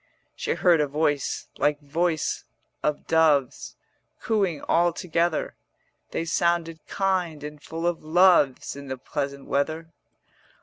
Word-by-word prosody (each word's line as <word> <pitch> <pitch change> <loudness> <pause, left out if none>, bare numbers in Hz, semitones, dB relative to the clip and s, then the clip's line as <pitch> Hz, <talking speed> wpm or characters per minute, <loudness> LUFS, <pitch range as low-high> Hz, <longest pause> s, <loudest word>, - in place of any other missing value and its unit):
She - - -2
heard 170 -4 +4
a 150 - +1
voice 145 -1 -1
like 150 0 +2
voice 160 +2 -1 0.4
of 150 -1 -1
doves 150 -5 +2 0.5
Cooing 195 -8 0
all 175 +1 +3
together: 170 -1 -1 0.6
They 165 - -3
sounded 170 -1 0
kind 180 -6 -1
and 150 0 -8
full 165 +2 -5
of 175 -1 0
loves 165 -6 +4
In 140 0 -9
the 130 0 -4
pleasant 140 +1 -4
weather. 160 +4 -2
160 Hz, 125 wpm, -25 LUFS, 145-170 Hz, 0.6 s, heard